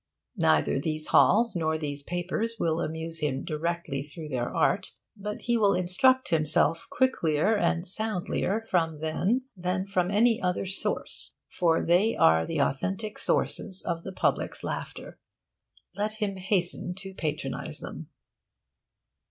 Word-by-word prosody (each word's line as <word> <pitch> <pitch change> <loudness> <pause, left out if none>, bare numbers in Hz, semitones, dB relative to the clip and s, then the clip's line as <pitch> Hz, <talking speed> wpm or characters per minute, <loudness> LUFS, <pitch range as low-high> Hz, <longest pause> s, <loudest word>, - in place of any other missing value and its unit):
Neither 80 - +3
these 155 +1 +1
halls 225 +1 +5
nor 160 -2 0
these 145 -2 -4
papers 180 +8 -3
will 165 0 0
amuse 160 +1 -3
him 135 -3 -1
directly 155 -2 -2
through 155 +2 -8
their 125 -3 -2
art, - - +1 0.2
but 210 0 -6
he 240 -1 +1
will 205 -3 +3
instruct 220 +9 +3
himself 160 0 +2
quicklier 205 - +2
and 175 -4 +1
soundlier 215 +1 0
from 165 -5 +1
them 180 - 0
than 180 +1 -2
from 185 -2 0
any 225 +3 +3
other 180 +1 0
source, 195 +1 -4
for 165 -2 +1
they 185 +7 +3
are 80 0 +4
the - - -2
authentic 195 +10 -1
sources 190 -2 0
of 170 -2 -2
the 190 - -7
public's 185 - -1
laughter. - - -6 0.8
Let 210 +1 -1
him 210 -3 -3
hasten 180 -1 0
to 190 0 -8
patronise 150 -6 -3
them. - - -8
180 Hz, 135 wpm, -27 LUFS, 155-205 Hz, 0.8 s, halls